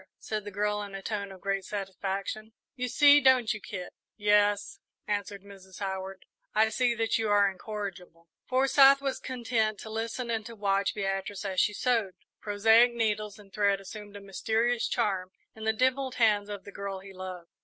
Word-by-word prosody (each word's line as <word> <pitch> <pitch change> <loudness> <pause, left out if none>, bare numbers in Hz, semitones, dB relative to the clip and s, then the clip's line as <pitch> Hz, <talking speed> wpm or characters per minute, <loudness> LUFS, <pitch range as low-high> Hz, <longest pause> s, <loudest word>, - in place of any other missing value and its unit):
said 215 -1 -4
the 205 - -6
girl, 210 +1 -1
in 200 -1 -7
a 195 - -6
tone 200 -2 -3
of 190 -2 -12
great 195 -1 -1
satisfaction; 200 +2 -4 0.2
"you 250 -1 -2
see, 290 +3 +6
don't 255 -4 +4
you, 215 - -7
Kit?" 180 -3 -7 0.2
"Yes," 205 -1 +2 0.3
answered 205 -1 -3
Mrs. 190 -2 -13
Howard, 190 -1 -5 0.3
"I 220 +1 +4
see 240 +1 +1
that 225 0 0
you 220 -1 0
are 205 -1 +5
incorrigible." 185 -4 -7 0.2
Forsyth 270 +1 +6
was 275 -1 -2
content 230 -4 -1
to 220 - -8
listen 230 +2 -3
and 225 -1 -1
to 230 - -9
watch 200 -1 0
Beatrice 195 0 -3
as 190 -2 -1
she 210 - +2
sewed. 225 -7 0 0.2
Prosaic 225 +4 +4
needles 215 -2 -1
and 200 -2 -17
thread 200 -1 +2
assumed 205 +1 -10
a 205 - -8
mysterious 225 +4 0
charm 195 -6 -1 0.3
in 220 0 -8
the 220 - +4
dimpled 260 +2 +1
hands 210 -3 +3
of 205 -2 -6
the 200 - -10
girl 200 -1 -5
he 195 0 -12
loved. 185 -2 -8
210 Hz, 180 wpm, -29 LUFS, 195-225 Hz, 0.3 s, see